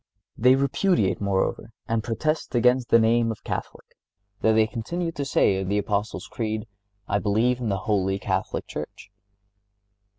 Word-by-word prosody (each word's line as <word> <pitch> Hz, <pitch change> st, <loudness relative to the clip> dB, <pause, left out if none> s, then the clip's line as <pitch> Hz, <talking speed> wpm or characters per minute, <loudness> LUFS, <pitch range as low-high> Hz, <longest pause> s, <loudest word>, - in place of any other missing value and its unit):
They 125 Hz, +3 st, +5 dB
repudiate, 140 Hz, -, +1 dB
moreover, 100 Hz, +3 st, -1 dB
and 115 Hz, -1 st, 0 dB
protest 135 Hz, +6 st, -2 dB
against 125 Hz, +1 st, +3 dB
the -, -, +7 dB
name 115 Hz, 0 st, +3 dB
of 110 Hz, -, -8 dB
Catholic, -, -, -5 dB, 0.6 s
though 110 Hz, -, +4 dB
they 110 Hz, 0 st, +4 dB
continue 165 Hz, +10 st, -3 dB
to 145 Hz, -, -4 dB
say 100 Hz, -7 st, +2 dB
in 95 Hz, -, -4 dB
the 100 Hz, -, +1 dB
Apostles' 105 Hz, +1 st, -2 dB
Creed 110 Hz, -2 st, -3 dB, 0.4 s
"I 100 Hz, -, +1 dB
believe 115 Hz, +5 st, +1 dB
in 120 Hz, -3 st, -2 dB
the 100 Hz, -, 0 dB
Holy 95 Hz, -3 st, +1 dB
Catholic -, -, -2 dB
Church." -, -, -8 dB
115 Hz, 155 wpm, -25 LUFS, 105-125 Hz, 0.6 s, the